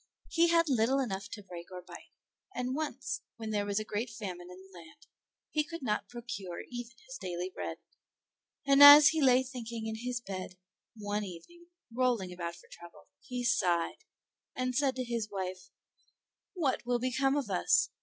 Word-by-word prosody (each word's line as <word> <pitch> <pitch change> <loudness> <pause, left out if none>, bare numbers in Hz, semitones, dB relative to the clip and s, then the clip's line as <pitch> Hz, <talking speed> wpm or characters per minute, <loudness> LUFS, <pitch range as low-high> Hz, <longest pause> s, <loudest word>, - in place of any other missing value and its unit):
He 340 0 +4
had 335 0 +4
little 255 0 +2
enough 200 -6 -3
to 205 -1 -8
break 175 -2 -10
or 180 - -6
bite, 175 -1 -13 0.4
and 250 +1 -2
once, 310 0 -3 0.2
when 220 -1 -5
there 205 -1 0
was 200 +1 0
a - - -3
great 215 +3 -3
famine 185 -6 -7
in 180 - -11
the 190 - -19
land, 170 - -16 0.5
he 305 - +2
could 335 0 -8
not 210 -4 -1
procure 230 -7 -6
even 240 -1 -6
his 260 +1 -9
daily 180 -1 -4
bread; - - -5 0.9
and 275 0 +5
as 290 +1 +12
he 315 0 0
lay 260 -1 +5
thinking 235 -3 -6
in 220 0 -3
his 245 +1 -3
bed 185 -4 -7 0.4
one 210 -1 -2
evening, 205 - -11 0.3
rolling 235 -7 0
about 170 -1 -5
for 170 - -17
trouble, 175 0 -14
he 250 -1 -5
sighed, 180 -9 +1 0.5
and 255 0 -1
said 270 -1 +2
to 255 - -2
his 235 -3 -3
wife, 185 -1 -5 0.8
"What 310 -9 0
will 245 0 +1
become 255 +3 +1
of 265 -8 -2
us? 85 0 +3
230 Hz, 175 wpm, -31 LUFS, 190-260 Hz, 0.9 s, as